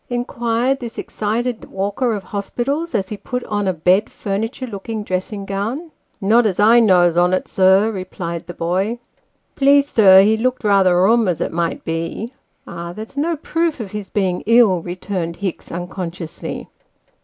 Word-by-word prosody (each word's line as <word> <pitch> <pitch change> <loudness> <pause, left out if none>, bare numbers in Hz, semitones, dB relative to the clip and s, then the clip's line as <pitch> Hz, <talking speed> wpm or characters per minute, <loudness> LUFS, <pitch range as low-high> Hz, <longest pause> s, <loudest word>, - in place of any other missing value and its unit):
inquired 240 +1 -1
this 235 -3 -7
excited 225 +3 -2
walker 205 +5 -1
of 200 - -6
hospitals, 245 - -3
as 195 -3 -1
he 210 - -5
put 250 +4 -4
on 205 -2 -2
a - - +3
bod 180 +5 +2
furniture 220 +6 -3
looking 220 -1 -5
dressing 195 +1 -3
gown. 225 - -4
" - - -44
Not 220 +4 +4
as 190 -2 -2
I 225 +3 +6
knows 180 -6 +4
on, 180 +1 +3
sir," 190 +3 +3
replied 185 -4 -5
the 175 - -8
boy. 190 +7 -1 0.3
" - - -46
Please, 280 +1 +4
sir, 195 -6 +7
he 215 +2 +3
looked 255 +2 -1
rather 195 -4 +4
rum, 225 +2 +4
as 175 -3 0
it - - -2
might 170 0 -2
be." 165 +9 -4 0.3
"Ah, 170 0 -7
that's 220 +7 -9
no 325 +4 0
proof 325 0 -1
of 210 -5 -6
his 210 -2 -6
being 185 -3 -1
ill," 225 -6 +5
returned 175 -1 -4
Hicks, 190 -1 -5
uncon 175 +1 -4
sciously. 170 -2 -7
205 Hz, 170 wpm, -19 LUFS, 185-235 Hz, 0.3 s, sir